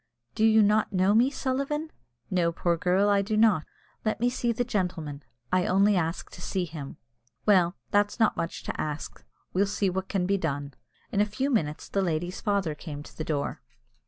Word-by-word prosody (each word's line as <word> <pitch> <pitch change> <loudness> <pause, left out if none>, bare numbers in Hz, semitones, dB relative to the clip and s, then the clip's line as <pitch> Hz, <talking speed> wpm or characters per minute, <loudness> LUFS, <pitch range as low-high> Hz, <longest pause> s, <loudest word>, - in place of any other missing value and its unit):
"Do 215 - 0
you 220 -1 +6
not 210 +1 +3
know 190 +1 +3
me, 240 +4 +5
Sullivan?" 280 +3 -2 0.4
"No, 175 -2 +2
poor 170 +1 0
girl, 185 +4 +2
I 200 -1 +4
do 215 +2 -1
not." 215 -8 +4 0.4
"Let 215 -1 0
me 245 +1 +2
see 240 -1 0
the 235 +2 0
gentleman. 175 - -2 0.3
I 185 -1 +3
only 200 +2 +4
ask 165 0 -2
to - - -11
see 185 -2 -1
him." 150 -4 -8 0.5
"Well, 185 -3 +4 0.2
that's 205 +3 +2
not 220 - +4
much 165 - -4
to - - -3
ax; 150 0 -3 0.4
we'll 195 +2 +2
see 195 -1 0
what 190 +1 -3
can 190 -3 0
be 195 +1 +1
done." 145 -4 -3 0.4
In 205 - +2
a - - +4
few 260 +7 -1
moments 155 - -1
the 195 - 0
lady's 175 0 -2
father 200 -6 0
came 145 -1 -7
to - - -14
the 155 - -4
door. 150 -3 -2
195 Hz, 195 wpm, -27 LUFS, 170-215 Hz, 0.5 s, you